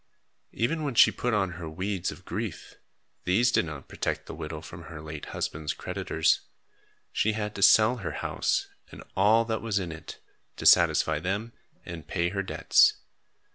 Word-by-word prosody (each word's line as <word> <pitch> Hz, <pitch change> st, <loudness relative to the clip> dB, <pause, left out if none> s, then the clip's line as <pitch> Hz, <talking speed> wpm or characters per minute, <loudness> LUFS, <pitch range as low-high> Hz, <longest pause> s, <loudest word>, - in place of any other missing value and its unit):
Even 155 Hz, +8 st, 0 dB
when 140 Hz, -4 st, -2 dB
she -, -, +7 dB
put 125 Hz, -, -2 dB
on 100 Hz, -4 st, +1 dB
her 80 Hz, -, -5 dB
weeds 95 Hz, +3 st, -2 dB
of 85 Hz, +4 st, -13 dB
grief, 100 Hz, -1 st, -5 dB, 0.5 s
these 115 Hz, +7 st, +3 dB
did 100 Hz, -, +2 dB
not 75 Hz, -4 st, -8 dB
protect -, -, -3 dB
the -, -, -8 dB
widow 75 Hz, 0 st, -6 dB
from 85 Hz, +1 st, -10 dB
her 80 Hz, -2 st, -9 dB
late 75 Hz, -1 st, -7 dB
husband's 75 Hz, 0 st, -3 dB
creditors. -, -, 0 dB, 0.7 s
She 110 Hz, -, +1 dB
had 105 Hz, -1 st, -3 dB
to 100 Hz, -, -6 dB
sell 110 Hz, +5 st, +6 dB
her 95 Hz, -, -5 dB
house -, -, -1 dB, 0.3 s
and -, -, -10 dB
all 110 Hz, +4 st, +4 dB
that 110 Hz, -1 st, -2 dB
was 115 Hz, -3 st, -1 dB
in 90 Hz, -4 st, -2 dB
it, 80 Hz, -, -9 dB, 0.4 s
to -, -, -6 dB
satisfy 80 Hz, -2 st, +5 dB
them 100 Hz, +7 st, -3 dB, 0.3 s
and 80 Hz, -3 st, -8 dB
pay 85 Hz, -2 st, 0 dB
her 100 Hz, +1 st, -2 dB
debts. 95 Hz, -, +4 dB
95 Hz, 175 wpm, -27 LUFS, 80-110 Hz, 0.7 s, she